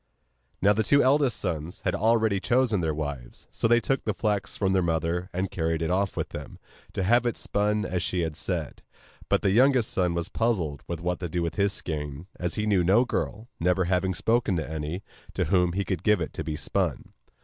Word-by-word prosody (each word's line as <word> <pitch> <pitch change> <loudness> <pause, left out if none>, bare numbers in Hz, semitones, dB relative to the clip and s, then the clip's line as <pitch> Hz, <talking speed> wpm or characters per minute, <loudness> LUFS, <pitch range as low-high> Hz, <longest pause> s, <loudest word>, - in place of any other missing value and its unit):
Now 100 +1 +6
the 110 - +1
two 140 +6 +4
eldest 135 -2 +3
sons 80 +1 -4
had 90 - 0
already 110 -1 +2
chosen 120 -3 +2
their 80 -1 0
wives; 70 -6 -6
so - - 0
they 120 +1 +5
took 135 +2 -1
the 110 - -1
flax 105 -2 -1
from 95 -2 +1
their 95 - +3
mother, 85 +2 -1
and 95 +1 -2
carried 80 -1 -1
it 80 - -1
off 95 +1 0
with - - -2
them, - - -8 0.4
to 95 - -1
have 120 +6 +4
it 120 - -1
spun 105 +1 0
as 90 -3 -1
she 90 0 -1
had 80 -2 -2
said. - - -3 0.5
But - - +2
the 95 - +3
youngest 125 +1 +4
son 90 -2 +1
was 85 0 -1
puzzled 90 - -1
what 85 +1 -2
to 90 - -4
do 85 +2 -1
with 85 -1 -2
his 100 +3 +1
skein, 75 -4 -5
as 90 -1 -2
he 105 - -1
knew 100 -4 +3
no 100 +8 +4
girl 110 -2 -3
(never 90 +2 +2
having 95 +1 +1
spoken 110 +1 +1
to 80 -4 -2
any) 80 +4 -4 0.3
to - - +1
whom 90 -3 +2
he 100 +1 -1
could 90 -2 -2
give 105 0 +3
it 80 - -4
to - - -4
be 80 - -3
spun. - - -2
95 Hz, 215 wpm, -27 LUFS, 85-105 Hz, 0.5 s, Now